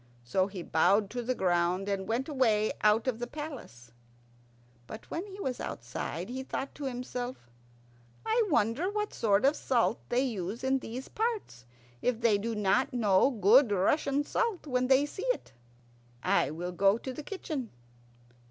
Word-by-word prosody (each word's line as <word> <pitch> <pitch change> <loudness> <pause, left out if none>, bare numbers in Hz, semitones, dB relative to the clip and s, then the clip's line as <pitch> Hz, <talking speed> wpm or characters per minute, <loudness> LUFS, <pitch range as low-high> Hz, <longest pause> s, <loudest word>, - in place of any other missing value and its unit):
So 185 +11 +1
he 190 -3 -7
bowed 195 +6 +3
to 245 - -3
the 250 +2 -1
ground, 180 0 +1
and 195 -1 -2
went 240 +4 -1
away 225 -8 +2
out 215 +2 +4
of 240 -3 0
the 240 - -3
palace. 255 - -8 1.0
But 220 - -10
when 350 +5 -3
he 390 0 -10
was 260 -9 -3
outside 135 +8 -5
he 260 +2 -4
thought 270 +1 -4
to 285 - -7
himself, 245 - -5 0.7
"I 450 +2 +2
wonder 280 - +2
what 420 0 -2
sort 210 +1 +2
of 285 +3 +4
salt 240 -3 +1
they 245 +1 +2
use 220 -3 -3
in 265 0 +2
these 255 +2 -7
parts 430 - -3 0.4
if 245 -2 0
they 225 -4 +3
do 225 +2 -3
not 210 +6 +1
know 210 -1 +4
good 230 +1 +5
Russian 280 - +2
salt 430 +3 -1
when 255 -3 0
they 265 +2 +5
see 385 +10 -6
it. - - -2 0.7
I - - +2
will 175 +4 -4
go 195 +3 +3
to 260 +2 -6
the 305 - -6
kitchen." 295 - -5
240 Hz, 165 wpm, -30 LUFS, 200-275 Hz, 1.0 s, good